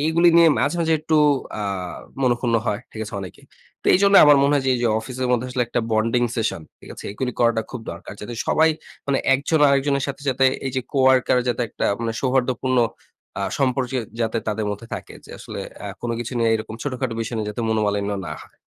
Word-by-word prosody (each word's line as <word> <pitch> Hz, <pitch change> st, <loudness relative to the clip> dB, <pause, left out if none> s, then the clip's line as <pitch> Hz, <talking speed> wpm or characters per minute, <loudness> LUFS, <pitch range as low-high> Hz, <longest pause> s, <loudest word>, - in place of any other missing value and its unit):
এইগুলি 160 Hz, +3 st, +4 dB
নিয়ে 170 Hz, -1 st, +7 dB
মাঝে, 145 Hz, +6 st, +1 dB
মাঝে 165 Hz, -1 st, +2 dB
একটু 155 Hz, 0 st, +1 dB, 0.4 s
আ -, -, -2 dB, 0.6 s
মনোক্ষুণ্ণ 120 Hz, -1 st, +1 dB
হয়। 105 Hz, 0 st, -1 dB
ঠিক 110 Hz, -, -7 dB
আছে? 105 Hz, -, -9 dB
অনেকেই। 95 Hz, -3 st, -10 dB, 0.4 s
তো -, -, -10 dB
এইজন্যে 200 Hz, +1 st, +6 dB
আমার 145 Hz, -1 st, +7 dB
মনে 140 Hz, +1 st, +3 dB
হয়, 140 Hz, -, +2 dB
যে 130 Hz, -, +3 dB
এই -, -, -1 dB
যে -, -, +3 dB
অফিসের 130 Hz, +2 st, -4 dB
মধ্যে 125 Hz, +1 st, 0 dB
আসলে 125 Hz, 0 st, 0 dB
একটা 120 Hz, +1 st, -1 dB
বন্ডিং 115 Hz, +3 st, +2 dB
সেশন, 110 Hz, -7 st, -1 dB, 0.2 s
ঠিক -, -, -14 dB
আছে? -, -, -11 dB
এইগুলি 125 Hz, +4 st, -3 dB
করাটা 115 Hz, -2 st, +3 dB
খুব 125 Hz, -, -6 dB
দরকার। 85 Hz, +5 st, -10 dB
যাতে 120 Hz, +3 st, -6 dB
সবাই 160 Hz, +1 st, +4 dB, 0.4 s
মানে 140 Hz, -1 st, +1 dB, 0.2 s
একজন 145 Hz, +4 st, +1 dB
আরেকজনের 140 Hz, 0 st, +2 dB
সাথে 140 Hz, +1 st, -6 dB
যাতে 135 Hz, 0 st, +2 dB, 0.2 s
এই 135 Hz, -, -1 dB
যে -, -, +2 dB
কো-ওয়ার্কার 130 Hz, -2 st, +4 dB
যাতে 120 Hz, 0 st, 0 dB
একটা -, -, -2 dB
মানে 115 Hz, -1 st, -1 dB
সৌহার্দ্যপূর্ণ 130 Hz, -1 st, 0 dB, 0.6 s
আ -, -, -1 dB, 0.2 s
সম্পর্কে 130 Hz, -1 st, 0 dB, 0.2 s
যাতে 110 Hz, 0 st, 0 dB
তাদের 105 Hz, 0 st, -1 dB
মধ্যে 105 Hz, +3 st, -6 dB
থাকে। -, -, -8 dB
যে -, -, -13 dB
আসলে -, -, -7 dB, 0.2 s
আ -, -, -4 dB, 0.2 s
কোন 120 Hz, -, -2 dB
কিছু 120 Hz, +2 st, -5 dB
নিয়ে 115 Hz, -1 st, +2 dB
এরকম 110 Hz, 0 st, -4 dB
ছোটখাটো 130 Hz, -4 st, -3 dB
বিষয় 115 Hz, +1 st, -3 dB
নিয়ে 105 Hz, -1 st, -2 dB
যাতে 115 Hz, +3 st, -4 dB
মনোমালিন্য 105 Hz, -2 st, 0 dB, 0.2 s
না 75 Hz, -, -5 dB
হয়। -, -, -19 dB
125 Hz, 210 wpm, -22 LUFS, 115-135 Hz, 0.6 s, নিয়ে